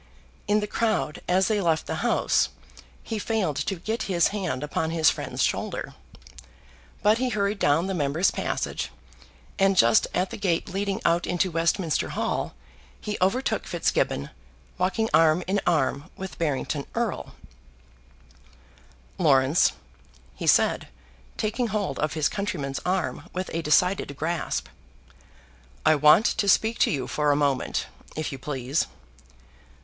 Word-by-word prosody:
In 210 +1 +3
the - - -1
crowd 215 -7 -1
as 185 +1 +3
they 215 -2 +1
left 165 -3 +1
the - - -3
House - - +2 0.5
he 220 -2 -4
failed 205 -8 -1
to 150 +7 -1
get 220 +6 -3
his 175 -3 +3
hand 185 -10 -3
upon 160 +2 -1
his 160 -1 +4
friend's - - -3
shoulder. - - -2 1.1
But 215 +2 +4
he 255 0 0
hurried 200 -2 -1
down 150 +4 +3
the 195 - -2
members' 155 +2 +1
passage, - - -3 0.7
and 195 0 +3
just 115 -5 +5
at 185 +3 -1
the 230 - -5
gate 180 -5 0
leading 195 +1 -2
out 170 +1 +2
into 180 +1 0
Westminster 165 0 0
Hall - - -2 0.4
he 210 - -4
overtook 215 +8 +1
Fitzgibbon - - 0 0.5
walking 190 +5 +1
arm 160 +2 +4
in 195 +2 0
arm 150 -1 +1
with 190 0 -7
Barrington 145 -2 -1
Erle. 230 -2 -2 1.9
"Laurence," 135 - +4 0.6
he - - -6
said, - - +3 0.5
taking 225 +3 -1
hold 205 -10 -2
of 150 0 0
his 155 -2 +1
countryman's 150 -9 -3
arm 185 0 -2
with 185 +1 -4
a 165 - -1
decided 160 -1 +2
grasp, 165 +1 -2 1.2
"I 155 - +6
want 150 +8 +6
to 210 -4 +1
speak 220 +4 +3
to - - +4
you 135 -4 -1
for 150 +3 0
a - - +3
moment, 140 -3 0 0.3
if 155 -1 -3
you 135 - -7
please." 135 +1 -1
175 Hz, 140 wpm, -25 LUFS, 150-200 Hz, 1.9 s, I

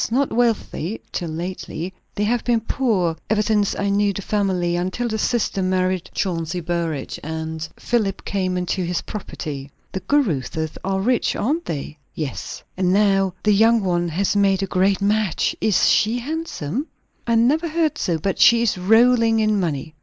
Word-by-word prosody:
Not 265 +4 +1
wealthy, 225 -4 0
till 170 -3 -3
lately. 175 +1 -5 0.2
They 205 - 0
have 235 +2 +1
been 235 -2 +2
poor, 210 -9 0
ever 215 0 +2
since 210 -2 +1
I 200 0 0
knew 200 0 +2
the 200 - -5
family; 185 -5 0
until 185 +7 -1
the 220 -1 -2
sister 220 -4 0
married 185 -1 0
Chauncey 175 -2 -1
Burrage, 165 -4 -3
and 160 0 -4
Philip 210 -5 -1
came 185 -2 -1
into 180 +1 -1
his 175 0 -1
property." 145 -9 -6 0.2
"The 190 - -3
Caruthers 160 - 0
are 195 0 0
rich, 245 +4 +1
aren't 310 +9 -1
they?" 150 0 -5 0.2
"Yes." 150 -5 -5
"And 185 -1 +1
now 195 -2 +3
the 210 - +4
young 225 +2 +4
one 175 -2 +1
has 190 +5 0
made 195 -1 +3
a - - +1
great 190 +1 +1
match? 205 -3 +1
Is 210 -4 +3
she 220 +3 +3
handsome?" 280 - -4 0.4
"I 230 - +3
never 280 +9 +3
heard 320 -2 0
so. 170 -4 0
But 190 +5 -2
she 235 0 +6
is 210 -5 0
rolling 225 +3 +4
in 215 -1 +2
money." 155 -3 -2
195 Hz, 170 wpm, -22 LUFS, 175-225 Hz, 0.4 s, she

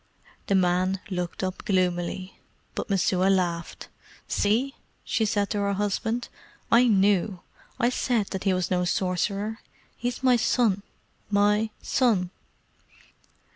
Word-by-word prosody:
The 195 - +2
man 185 +1 +2
looked 180 0 -3
up 185 0 -3
gloomily, 185 0 -1 0.3
but - - -4
Messua 190 -1 +2
laughed. 175 -3 -1 0.4
"See!" 235 +7 +1 0.3
she 220 - 0
said 205 -1 0
to 210 - 0
her 200 0 0
husband, 220 +4 -1 0.4
"I 245 +2 +6
knew 195 -3 +2 0.4
I 240 - +3
said 240 -4 0
that 190 +1 -4
he 195 - +4
was 185 -1 -1
no 180 -1 +2
sorcerer. 195 +4 -1 0.4
He 245 - -3
is 245 +2 -4
my 250 -2 +5
son 220 -4 +2 0.5
my 210 +2 +3
son!" 210 -9 +2
200 Hz, 130 wpm, -26 LUFS, 185-220 Hz, 0.5 s, I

